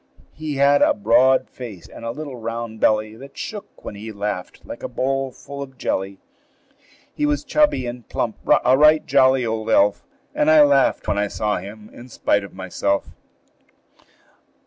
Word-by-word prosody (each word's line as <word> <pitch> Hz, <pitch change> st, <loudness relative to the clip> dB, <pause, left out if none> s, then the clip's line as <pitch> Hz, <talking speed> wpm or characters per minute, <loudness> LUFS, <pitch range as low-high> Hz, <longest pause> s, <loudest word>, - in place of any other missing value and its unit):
He 155 Hz, -1 st, -5 dB
had 140 Hz, +1 st, +4 dB
a -, -, +4 dB
broad 130 Hz, +5 st, +3 dB
face 110 Hz, -9 st, -10 dB
and -, -, -12 dB
a 115 Hz, -, -3 dB
little 140 Hz, +1 st, -6 dB
round 115 Hz, -1 st, -5 dB
belly 110 Hz, 0 st, +1 dB
That 135 Hz, +4 st, -13 dB
shook, 210 Hz, -2 st, -8 dB
when -, -, -6 dB
he 105 Hz, +2 st, -8 dB
laughed, 100 Hz, -3 st, -5 dB
like -, -, -9 dB
a -, -, -4 dB
bowl 135 Hz, 0 st, -2 dB
full 140 Hz, +2 st, -10 dB
of 135 Hz, -2 st, -9 dB
jelly. 95 Hz, -3 st, -2 dB, 1.0 s
He 295 Hz, -, 0 dB
was 295 Hz, 0 st, 0 dB
chubby 295 Hz, -, +2 dB
and 120 Hz, 0 st, -7 dB
plump 115 Hz, -3 st, -2 dB, 0.3 s
a 130 Hz, -, +5 dB
right 150 Hz, +2 st, +5 dB
jolly 130 Hz, -1 st, +3 dB
old 110 Hz, 0 st, -3 dB
elf; 105 Hz, -2 st, +3 dB, 0.3 s
And 150 Hz, -, +1 dB
I 155 Hz, -1 st, +7 dB
laughed, 140 Hz, -2 st, +2 dB
when 100 Hz, -, 0 dB
I 105 Hz, -, +1 dB
saw 105 Hz, +1 st, -1 dB
him, 105 Hz, +2 st, -9 dB
in 120 Hz, +2 st, -12 dB
spite 100 Hz, -3 st, 0 dB
of 100 Hz, -, -10 dB
myself. 95 Hz, +1 st, -2 dB
120 Hz, 170 wpm, -21 LUFS, 105-140 Hz, 1.0 s, I